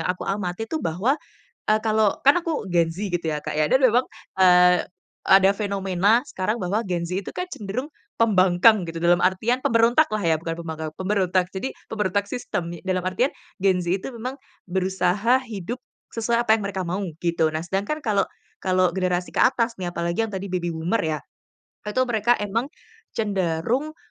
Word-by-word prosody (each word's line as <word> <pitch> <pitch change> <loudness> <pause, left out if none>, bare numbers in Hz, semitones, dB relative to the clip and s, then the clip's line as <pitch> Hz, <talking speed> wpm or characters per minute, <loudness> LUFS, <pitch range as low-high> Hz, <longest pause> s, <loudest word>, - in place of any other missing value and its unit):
yang - - -1
aku 180 - -9
amati 195 0 -2
itu 320 - -2
bahwa, 190 - +1 0.6
eee, 215 - +4
kalau 215 -2 +2
kan 280 +6 +6
aku 330 - -3
Gen 170 -1 +3
Z 185 +5 -6
gitu 175 -1 -2
ya 150 - -2
Kak - - -4
ya, 150 - +3
dan 260 - +5
memang, 250 0 +5 0.4
eee, 180 -1 +6 0.4
ada 195 0 +6
fenomena 200 +1 +2
sekarang 190 +4 -2
bahwa 200 +5 -1
Gen 175 -2 -1
Z 180 +2 -2
itu - - -7
kan 360 0 -3
cenderung 215 +7 -4 0.3
pembangkang 190 -2 +4
gitu, 165 0 -5
dalam 175 0 +4
artian 215 +7 +2
pemberontaklah 230 0 +3
ya, 165 -1 +3
bukan 165 0 -4
pembangkang, 160 -2 -5
pemberontak. 185 -1 +1
Jadi, 200 +8 -4 0.2
pemberontak 205 -2 0
sistem, 180 -9 -3
nye 175 - -7
dalam 185 -1 0
artian 185 +9 0 0.3
Gen 190 -1 +3
Z 175 - -7 0.2
itu - - -4
memang 250 +4 -5 0.3
berusaha 190 +6 +1
hidup 225 0 -6 0.3
sesuai 235 +1 0
apa 220 - +5
yang 220 - +1
mereka 190 -2 -3
mau 185 +4 -2 0.2
gitu. 170 -2 +2
Nah 155 +2 -4
sedangkan 195 - -2
kalau 205 -3 +2 0.4
kalau 185 -2 +2
generasi 180 -1 -1
ke - - +1
atas 235 -2 +3
nih, 175 - -2
apalagi 170 +3 -1
yang 225 - -1
tadi 195 -1 -5
baby 180 -2 -2
boomer 165 +7 -1
ya, 155 -1 -1 0.7
itu 255 +5 +1
mereka 240 0 +2
emang 220 +5 -2 0.5
cenderung, 210 - -1
195 Hz, 180 wpm, -23 LUFS, 180-225 Hz, 0.7 s, kan